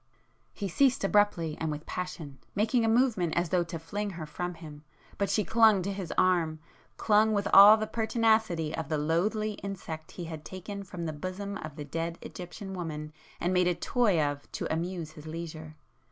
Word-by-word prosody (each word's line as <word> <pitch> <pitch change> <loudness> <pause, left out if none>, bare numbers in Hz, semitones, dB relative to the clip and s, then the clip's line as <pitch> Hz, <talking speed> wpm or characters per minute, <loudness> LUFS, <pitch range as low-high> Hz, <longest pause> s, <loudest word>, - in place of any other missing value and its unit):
He 200 - -4
ceased 260 +7 +2
abruptly 195 -6 +2
and 160 - 0
with 150 +1 -5
passion, 160 -7 -6 0.2
making 225 +4 +2
a - - +2
movement 225 -8 +2
as 170 -1 +1
though 180 0 +2
to 165 0 -5
fling 205 +6 -4
her 170 -4 -6
from 175 +4 -4
him,—but 155 +4 -7
she 210 - +2
clung 220 -1 +5
to 200 +2 -2
his 190 -4 -5
arm,—clung 185 +5 +1
with 200 -1 0
all 205 +2 +10
the 215 - -1
pertinacity 220 -8 +1
of 160 -3 -5
the 155 - 0
loathly 195 +8 0
insect 170 -5 -6
he 175 - -6
had 160 -2 -7
taken 200 +3 -7
from 180 -3 -6
the 160 - -3
bosom 185 +6 -5
of 155 -7 -8
the 150 -2 -6
dead 165 +3 -3
Egyptian 190 +2 -8
woman 155 -4 -5 0.3
and 180 +2 0
made 180 -1 +3
a 180 - +2
toy 210 -3 +2
of 145 -1 -2
to - - -3
amuse 170 -1 -3
his 155 0 -12
leisure! 155 -1 -7
180 Hz, 180 wpm, -29 LUFS, 160-205 Hz, 0.3 s, all